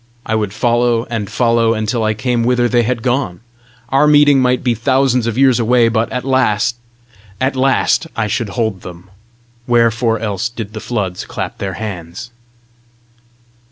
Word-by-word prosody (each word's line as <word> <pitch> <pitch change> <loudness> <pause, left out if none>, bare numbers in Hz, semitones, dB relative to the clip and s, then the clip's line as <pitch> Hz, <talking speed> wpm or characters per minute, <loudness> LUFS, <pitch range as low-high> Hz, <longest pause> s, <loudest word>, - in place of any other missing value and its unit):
I 110 - -2
would 105 -3 -1
follow 120 +1 +1
and 105 -4 -3
follow 115 -1 +2
until 110 +2 -1
I 110 0 0
came 120 +2 -1
whither 120 0 +2
they 120 0 +2
had 120 0 -2
gone! 120 -8 -1 0.5
Our 135 +3 +3
meeting 145 -2 +5
might 125 0 +1
be 125 -2 +2
thousands 125 0 +1
of 115 0 -2
years 130 -3 +4
away, 120 0 +3
but 115 0 -1
at 125 0 -4
last 125 -4 +1 0.6
AT 135 +1 0
LAST 135 +5 +1
I 115 - -1
should 110 +1 -2
hold 110 -4 -2
them! 90 +1 -11 0.6
Wherefore 115 -1 +2
else 105 +1 -3
did 115 -3 -7
the 110 - -5
floods 100 -6 -3
clap - - -6
their 95 -1 -3
hands? 100 +1 -7
115 Hz, 160 wpm, -16 LUFS, 110-125 Hz, 0.6 s, meeting